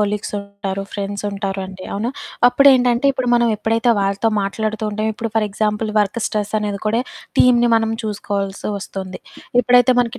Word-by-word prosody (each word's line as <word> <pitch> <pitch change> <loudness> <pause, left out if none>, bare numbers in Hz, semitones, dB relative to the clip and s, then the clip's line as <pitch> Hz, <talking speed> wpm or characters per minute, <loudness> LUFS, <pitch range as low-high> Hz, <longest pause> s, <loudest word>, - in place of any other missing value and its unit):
కొలీగ్సుంటారు, 200 -1 -3
ఫ్రెండ్సుంటారు 200 -1 -3
అండి. 185 0 -10
అవునా? 225 +5 -2 0.4
అప్పుడేంటంటే, 250 -2 +4
ఇప్పుడు 255 -2 -2
మనం 235 -1 +3
ఎప్పుడైతే 225 +3 +1
వాళ్ళతో 195 +3 +1
మాట్లాడుతూ 215 +2 -2
ఉంటామో 215 +1 -1
ఇప్పుడు 230 +1 -4
ఫర్ 215 -1 +2
ఎగ్జాంపుల్ 210 +1 -1
వర్క్ 210 +3 -1
స్ట్రెస్సనేది 210 -1 -2
కూడా. 225 +3 +2 0.4
టీమ్‌ని 240 -1 +5
మనం 225 0 0
చూసుకోవాల్సి 200 -2 -3
వస్తుంది. 190 -1 -7 0.4
ఎప్పుడైతే 245 +1 +4
మనకి 245 +1 -2
210 Hz, 135 wpm, -19 LUFS, 200-230 Hz, 0.4 s, టీమ్‌ని